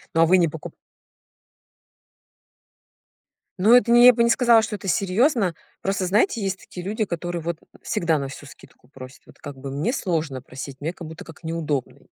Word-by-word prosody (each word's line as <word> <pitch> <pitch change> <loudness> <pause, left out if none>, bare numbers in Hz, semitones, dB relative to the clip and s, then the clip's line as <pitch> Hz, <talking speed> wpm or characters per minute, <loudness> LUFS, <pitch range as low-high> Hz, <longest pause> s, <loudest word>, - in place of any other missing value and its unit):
Ну, 165 - +4
а - - +7
вы 185 +3 +5
не 170 - +3
покуп 155 0 -8 2.9
Ну, 220 +5 +6
это 245 -1 +4
не 240 +1 +7
я 250 - +10
бы 235 - +2
не 235 - +3
сказала, 235 -2 +5
что 210 -1 -4
это 195 - -9
серьёзно. 195 - +1 0.3
Просто, 195 -1 -1
знаете, 215 - +1
есть 190 -1 -2
такие 180 - -10
люди, 215 +2 -1
которые 175 -2 -4
вот 170 0 -3 0.2
всегда 165 -2 0
на 135 -1 -4
всю 145 - -10
скидку 125 - -17
просят. 130 -1 -13
Вот - - -18
как 145 -2 -9
бы 135 +1 -7
мне 150 - -1
сложно 160 - -2
просить, 135 +1 -9
мне 160 +4 -3
как 170 - -10
будто 160 0 -10
как 165 +1 -14
неудобно. 155 -5 -3
175 Hz, 190 wpm, -23 LUFS, 150-210 Hz, 2.9 s, я